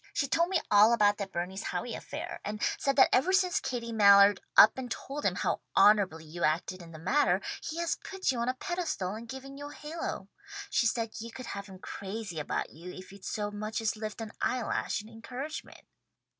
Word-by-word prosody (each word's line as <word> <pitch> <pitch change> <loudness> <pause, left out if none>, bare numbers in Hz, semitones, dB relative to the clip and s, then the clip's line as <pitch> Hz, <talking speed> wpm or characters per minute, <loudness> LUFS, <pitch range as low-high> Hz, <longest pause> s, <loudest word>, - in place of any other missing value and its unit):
She 280 - +1
told 335 +5 +2
me 375 -3 +2
all 210 +3 +7
about 205 -3 +4
that 195 -1 -4
Bernice 185 +3 -3
Howe - - -3
affair, - - -6
and 210 0 -4 0.2
said 275 -1 +1
that 265 - +7
ever 330 +9 +4
since 375 -2 +3
Katie 235 -2 -4
Mallard 200 -2 +7 0.2
up - - +9
and 250 -1 -5
told 285 +4 -5
him - - +1
how - - -1 0.2
honourably 190 -7 +5
you 170 +3 -6
acted 170 +4 0
in 170 -1 -12
the 160 - -9
matter, 260 - +2 0.2
he 320 - -5
has 340 0 0
put 385 -6 -2
you 250 - -3
on 235 +2 0
a 255 - -1
pedestal 330 - -2
and 225 +2 -8
given 270 +2 -8
you 290 0 -7
a - - -11
halo. 300 - -5 0.4
She 235 -1 +3
said 225 -1 -1
you 230 +1 -7
could 255 +2 -8
have 200 -2 -6
him 190 -1 -11
crazy 195 -2 -6
about 150 - -2
you 170 +4 -9
if 185 +1 -11
you'd 200 -1 -14
so 205 -1 -2
much 215 +1 -3
as 225 -1 0
lift 215 +1 -6
an 220 -1 -6
eyelash 235 -3 -1
in - - -13
encouragement." 250 +7 -8
220 Hz, 210 wpm, -30 LUFS, 200-265 Hz, 0.4 s, up